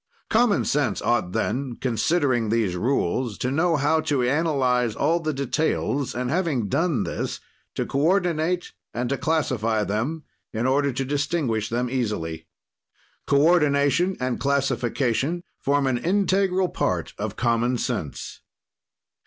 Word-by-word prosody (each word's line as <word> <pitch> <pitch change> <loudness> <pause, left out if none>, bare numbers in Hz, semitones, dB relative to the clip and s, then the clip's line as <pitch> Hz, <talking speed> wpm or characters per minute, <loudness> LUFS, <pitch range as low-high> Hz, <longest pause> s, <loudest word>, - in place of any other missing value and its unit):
"Common 225 -2 +3
sense 135 -8 0
ought 105 -7 +1
then, 125 +4 -2
considering 130 -1 +1
these 110 -5 +1
rules, 115 +1 0
to 125 - -2
know 165 +4 +2
how 150 +2 +2
to 140 -5 0
analyze 125 -5 +1
all 160 +7 +2
the 155 -2 -2
details 140 -1 -1
and, 125 +1 -2
having 155 - 0
done 155 - +1
this, - - -3 0.4
to - - -1
coordinate 175 +2 +1 0.2
and 120 +1 -1
to 140 - 0
classify 115 -9 0
them, 120 +11 -2 0.3
in 115 +2 -2
order 140 +2 +2
to 135 +2 -2
distinguish 140 -6 -1
them 120 +2 -1
easily. 105 -11 -3 0.8
"Coordination 150 +3 +3
and 125 -1 -1
classification 140 +2 0 0.2
form 140 0 +1
an 130 -2 +1
integral 190 +2 +1
part - - -2
of - - -3
common 120 +1 +1
sense." 105 - -4
135 Hz, 130 wpm, -24 LUFS, 120-160 Hz, 0.8 s, Common